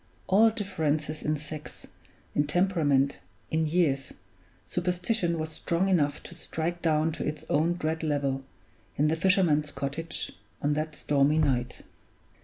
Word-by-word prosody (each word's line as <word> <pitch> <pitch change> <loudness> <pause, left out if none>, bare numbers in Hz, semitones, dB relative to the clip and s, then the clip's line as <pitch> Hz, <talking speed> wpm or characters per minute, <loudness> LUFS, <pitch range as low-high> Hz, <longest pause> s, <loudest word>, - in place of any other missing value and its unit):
All 215 +4 +6
differences 155 -8 -1
in 155 0 0
sex, 150 +1 -8 0.5
in 145 0 +1
temperament, 150 - +2 0.3
in 160 0 +1
years, 150 -5 +1 0.5
superstition 180 - 0
was 155 0 -2
strong 170 +4 0
enough 150 -6 +1
to - - -9
strike 170 +2 -3
down 160 -1 +2
to - - -4
its 150 0 -4
own 165 +4 +2
dread 160 -1 -2
level, 140 -3 0 0.5
in 150 +1 +2
the 160 - +2
fisherman's 165 -4 +3
cottage, 140 +4 -3 0.3
on 145 +1 +1
that 155 +1 -2
stormy 145 +1 +2
night. 125 -5 0
155 Hz, 135 wpm, -28 LUFS, 145-175 Hz, 0.5 s, All